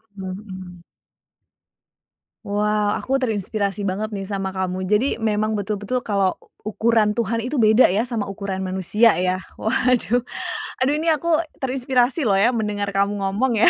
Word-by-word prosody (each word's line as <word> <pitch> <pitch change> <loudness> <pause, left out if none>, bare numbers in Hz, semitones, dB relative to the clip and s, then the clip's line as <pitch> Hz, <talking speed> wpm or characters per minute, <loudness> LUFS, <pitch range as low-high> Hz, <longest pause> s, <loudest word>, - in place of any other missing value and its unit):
Mhm. 185 -2 -8 1.6
Wow, 210 0 +1
aku 270 +1 -1
terinspirasi 205 -3 -1
banget 205 +3 -2
nih 195 -2 -5
sama 195 -1 -3
kamu. 185 -1 -3
Jadi, 225 +4 +1
memang 215 0 +1
betul-betul 210 +4 -2
kalau 200 -5 +1 0.3
ukuran 220 0 +2
Tuhan 230 0 -1
itu 250 +3 -1
beda 220 +3 +6
ya, 195 +4 +2
sama 235 -3 -2
ukuran 195 -1 -4
manusia 190 +5 +3
ya. 185 0 +1 0.2
Waduh, 245 +1 +1 0.6
aduh, 265 +3 +3
ini 315 - -3
aku 320 +1 +1 0.2
terinspirasi 260 +2 +1
loh 205 - +3
ya 200 +5 +4
mendengar 210 -4 -1
kamu 200 +1 +1
ngomong 215 +4 +1
ya. - - +8
210 Hz, 140 wpm, -22 LUFS, 195-235 Hz, 1.6 s, ya